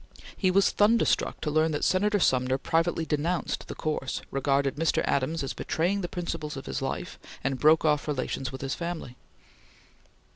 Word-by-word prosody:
He 185 - +1
was 195 +2 +4
thunderstruck 220 +3 +2
to 150 - -1
learn 155 +1 +2
that 145 - -2
Senator 205 +2 +2
Sumner 130 -5 +2
privately 165 +3 0
denounced 160 +3 -1
the - - -6
course, 150 -4 -3
regarded 135 0 +1
Mr. 160 +2 +1
Adams 140 +4 0
as 135 - -3
betraying 185 +5 -1
the 175 - -2
principles 165 -4 -4
of 135 - -7
his 65 - -3
life, - - -4 0.2
and 135 -1 -1
broke 155 +1 +5
off 150 -1 +2
relations 135 -2 -2
with 130 - -7
his 135 0 -2
family. 170 -7 -5
155 Hz, 170 wpm, -27 LUFS, 135-175 Hz, 0.2 s, broke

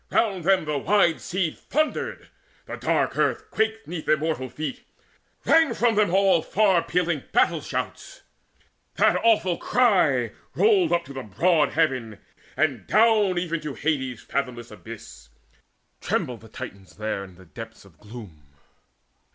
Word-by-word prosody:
Round 195 -6 +1
them 190 -3 +3
the 150 -2 -1
wide 170 +1 +2
sea 185 -3 -1
thundered, 310 - -3 0.4
the - - -6
dark - - 0
earth 435 0 0
Quaked 220 0 -1
'neath 165 -1 -6
immortal 155 -4 0
feet. 150 0 -5 0.6
Rang 325 -2 +4
from 235 -1 +2
them 210 -4 +2
all 190 -3 +4
Far 195 -3 +2
pealing 170 -4 -1
battle - - +2
shouts; - - -6 0.7
that - - +4
awful 210 -6 +3
cry 160 - +2 0.2
Rolled 400 -6 +3
up 170 0 +1
to 140 - -10
the 135 - -5
broad 150 - +2
arching - - -12
heaven, 130 -9 0 0.4
and 135 -10 0
down 215 -4 +4
Even 170 -2 -2
to 150 -3 -6
Hades' 130 -4 -2
fathomless 125 -4 -4
abyss: 105 - -11 0.7
Trembled 120 -2 -2
the 115 - -15
Titans 100 -2 -10
there 110 -2 -3
in 95 -2 -13 0.2
depths 115 -2 -10
of 85 -5 -21
gloom. 105 -8 -11
160 Hz, 145 wpm, -24 LUFS, 120-195 Hz, 0.7 s, Rang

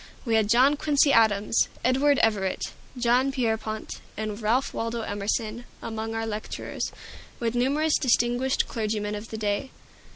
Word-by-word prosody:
We 230 - 0
had 220 -2 +3
John 260 +6 +5
Quincy 285 -1 +3
Adams, 215 -1 +3 0.2
Edward 270 +3 +3
Everett, 200 -4 0 0.3
John 250 +2 +3
Pierpont, 220 -4 -2 0.2
and 215 0 -4
Ralph 235 +5 +1
Waldo 230 0 -2
Emerson 215 +2 -2 0.2
among 225 0 -4
our 225 0 -1
lecturers, 215 -1 -4 0.5
with 230 -1 -1
numerous 285 +6 +2
distinguished 245 0 +2
clergymen 215 -2 -2
of 210 +1 -6
the 220 - -5
day. 210 +5 -1
225 Hz, 135 wpm, -26 LUFS, 215-255 Hz, 0.5 s, John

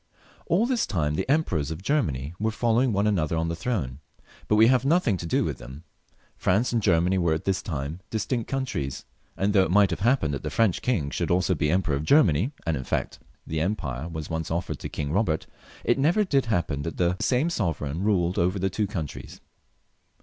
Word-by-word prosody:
All 190 +7 +3
this 245 -1 0
time 80 -7 0
the 75 - -2
emperors 95 - +1
of 80 +3 -6
Germany 75 - 0
were 110 +2 +1
following 120 +2 +1
one 100 0 +1
another 85 -6 +1
on 80 +1 0
the 85 - -2
throne, 80 - -3 0.5
but 105 - +3
we 110 +1 +7
have 125 +1 +4
nothing 140 - +2
to 85 - -6
do - - +1
with - - -3
them. 65 +6 -10 0.5
France 110 +7 +1
and 115 - +2
Germany 90 -1 +2
were 85 -3 +2
at 80 - -6
this 95 -1 0
time 75 0 -4
dis 110 -2 -2
tinct 120 -4 -2
countries, 125 - -3 0.3
and 100 +1 +1
though 100 - +5
it 95 - +1
might 100 +1 +4
have 85 - -2
happened 110 - +2
that 70 - -3
the - - -3
French 110 -6 +1
King 85 - 0
should 85 -1 -2
also 90 +1 +2
be 75 -2 0
Emperor 85 -3 +1
of 70 - -3
Grermany 95 - +4
— - - -26
and 80 -2 0
iu 65 - -4
fact - - -3 0.3
the 80 0 -2
empire 80 -7 -2
was 80 -2 -6
once 80 -1 -3
offered 85 +2 -3
to - - -6
King 70 -1 -4
Bobert 85 -4 0 0.2
— - - -21
it 120 - +2
never 170 +10 +3
did 140 -9 +1
happen 85 -9 0
that 80 +2 -5
the 90 0 +2
same 135 +7 +1
sovereign 80 - -2
ruled 95 -4 +1
over 90 +3 +1
the 95 0 -1
two 105 +2 -1
countries. 80 -7 -6
90 Hz, 220 wpm, -26 LUFS, 80-115 Hz, 0.5 s, we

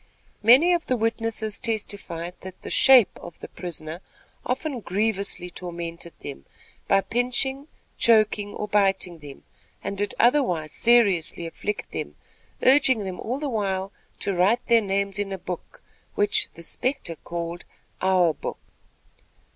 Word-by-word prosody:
Many 260 +11 +7
of 345 -1 -1
the 255 - +1
witnesses 225 -1 -1
testified 200 -6 -4
that 185 -1 -10
the - - -7
"shape" 260 -6 +6
of 175 - -10
the - - -8
prisoner 165 -1 -7 0.5
often 260 +1 -2
grievously 200 -3 -1
tormented 170 -1 -7
them, 70 0 -8 0.4
by 195 - +4
pinching, 250 +6 -1 0.3
choking, 215 -2 +3
or 210 - -4
biting 195 -4 +1
them, 145 -2 -11 0.4
and 200 0 -4
did 205 -1 -1
otherwise 230 - +3
seriously 200 -9 +3
afflict 200 +5 -4
them, - - -5 0.5
urging 260 -4 +5
them 185 -1 -5
all 245 +4 -3
the 295 - -2
while 195 -5 -1 0.3
to 200 - -1
write 190 +7 +2
their 235 -1 +5
names 200 0 -1
in 200 -1 -2
a 195 - -3
book, 185 - -8 0.3
which 205 0 +2
"the 170 - -11
spectre" 250 - -2
called: 170 +1 -5 0.4
"Our 185 -3 +3
book." - - -6
200 Hz, 140 wpm, -25 LUFS, 175-235 Hz, 0.5 s, Many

